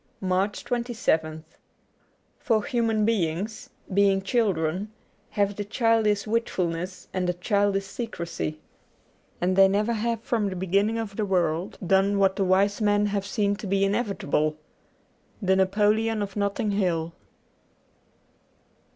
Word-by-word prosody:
Q2 - - -2
MARCH 195 +4 0
27th 225 -11 -1 1.0
FOR 225 -6 +1
human 230 -5 +1
beings, 205 0 -1 0.2
being 195 0 +3
children, 195 -4 0 0.4
have 200 -1 0
the 205 - -2
childish 215 -1 +1
wilfulness 185 -5 -2
and 180 -1 0
the 180 - 0
childish 200 +1 +1
secrecy. 170 -8 -5 0.8
And 185 +1 +1
they 195 0 +7
never 210 +4 +1
have 230 0 -1
from 220 -5 0
the 185 - -5
beginning 200 +5 +1
of 215 -3 -5
the 215 - 0
world 180 -2 0
done 195 +3 +3
what 195 -1 +3
the 195 - 0
wise 195 +3 +2
men 205 0 +3
have 200 -1 -1
seen 205 -1 0
to 205 - -6
be 195 +1 +2
inevitable. 195 -8 0 0.4
* - - -39 0.3
The 190 0 +3
Napoleon 210 +3 +2
of 200 -1 -7
Notting 205 +1 -1
Hill.' 170 -5 0
200 Hz, 135 wpm, -26 LUFS, 185-215 Hz, 1.0 s, they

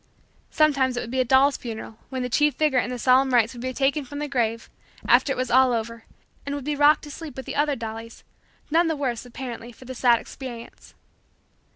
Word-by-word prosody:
Sometimes 275 -5 +2
it - - -1
would 235 - -7
be 260 - -1
a - - +4
doll's 265 +3 +4
funeral 225 -1 -8
when 260 -2 -3
the - - -1
chief 295 +4 +2
figure 300 -5 +2
in 245 - -2
the 250 - -4
solemn 255 +1 +3
rites 230 0 +3
would 240 - -9
be 255 +1 -3
taken 275 +3 0
from 285 +2 -9
the 295 0 -3
grave, 230 -4 -1 0.4
after 280 - +4
it - - 0
was 255 -1 -2
all 260 0 +5
over, 230 0 -4 0.4
and 285 0 -4
would 285 - -5
be 300 0 -1
rocked 290 +1 +4
to 295 - -9
sleep 295 -3 -9
with 265 - -6
the - - -5
other 290 0 +1
dollies, 225 -1 -8 0.5
none 335 +2 +4
the 320 - 0
worse, 250 -4 -3
apparently, 245 -1 -7
for 255 - -16
the 260 - -7
sad 245 -1 +4
experience. 240 -3 -10
260 Hz, 225 wpm, -24 LUFS, 235-285 Hz, 0.5 s, all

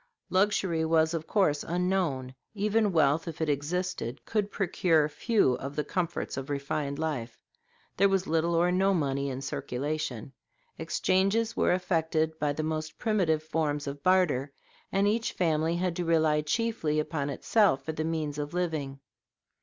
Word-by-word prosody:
Luxury 185 -4 +2
was, 160 0 +2
of 160 -1 -3
course, 170 -9 +2
unknown; 175 -7 -1 0.2
even 210 +1 +2
wealth, 160 0 +2
if 165 - -6
it 160 -1 0
existed, 145 -3 -2
could 210 -2 -1
procure 170 -6 +2
few 155 - +2
of 140 +2 -6
the 150 - 0
comforts 170 0 -3
of 135 +1 -5
refined 140 0 -2
life. 145 -7 -3 0.6
There 200 +1 +5
was 195 -1 +1
little 165 +1 +1
or 175 +2 +3
no 190 +2 +3
money 140 -3 0
in 135 +1 -5
circulation. 135 -2 -3 0.5
Exchanges 195 +5 +1
were - - +2
effected 160 -3 0
by 150 -1 +1
the 155 +2 -3
most 155 0 -3
primitive 180 -9 +1
forms 155 -2 -1
of 140 0 -6
barter, 155 -7 +2 0.4
and 195 +1 +2
each 225 +2 0
family 165 -1 +1
had 175 -1 -1
to 175 - -1
rely 160 -2 +3
chiefly 155 -2 0
upon 150 -2 -2
itself 140 -2 +2
for 160 - -2
the 155 0 -3
means 155 -2 -2
of 145 +3 -4
living. 155 -6 -2
160 Hz, 155 wpm, -28 LUFS, 145-185 Hz, 0.6 s, There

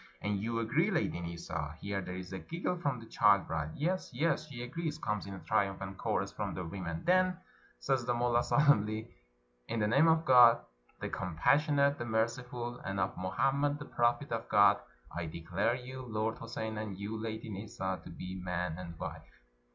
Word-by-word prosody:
" - - -30
And 105 -1 0
you 115 +2 -1
agree, 115 -1 +2
Lady - - 0
Nissa?" 85 -2 -4
Here 100 -1 -2
there 90 -1 -6
is 90 0 -7
a 95 - -4
giggle 175 - -2
from 140 -7 -1
the 115 - -10
child 105 -5 +4
bride. 80 -1 -3
" - - -10
Yes, 180 +5 -1
yes, 155 +4 0
she 125 -5 -7
agrees," 155 +4 -3
comes 105 -9 -2
in 100 - -6
a - - -8
triumphant 95 -2 -1
chorus - - 0
from - - -4
the 90 - -4
women. 85 -2 -5
"Then," 185 0 +4 0.4
says 135 -3 +1
the 120 0 0
mullah 120 0 +2
solemnly, 110 -6 +3 0.5
"in 115 - -2
the 105 - +2
name 140 +9 +5
of 160 0 +4
Gk>d 120 -2 +8 0.4
the - - -2
compassionate, 140 - +2
the 120 - -3
merciful, 120 +2 -2
and 100 0 -3
of 95 0 0
Mohammed 135 +10 +1
the 145 - -8
prophet 120 +4 +1
of 115 -1 -3
God, - - +6 0.4
I 85 -1 -2
declare 85 +9 -1
you, 130 +1 -7
Lord 110 -2 -2
Houssein, 110 -1 -4
and 105 -3 -5
you, 100 +3 -4
Lady 110 0 -4
Nissa, 95 -3 -4
to - - -10
be 90 +2 -6
man 90 -2 -2
and 85 -2 -7
wife." - - -8
110 Hz, 190 wpm, -33 LUFS, 95-130 Hz, 0.5 s, Gk>d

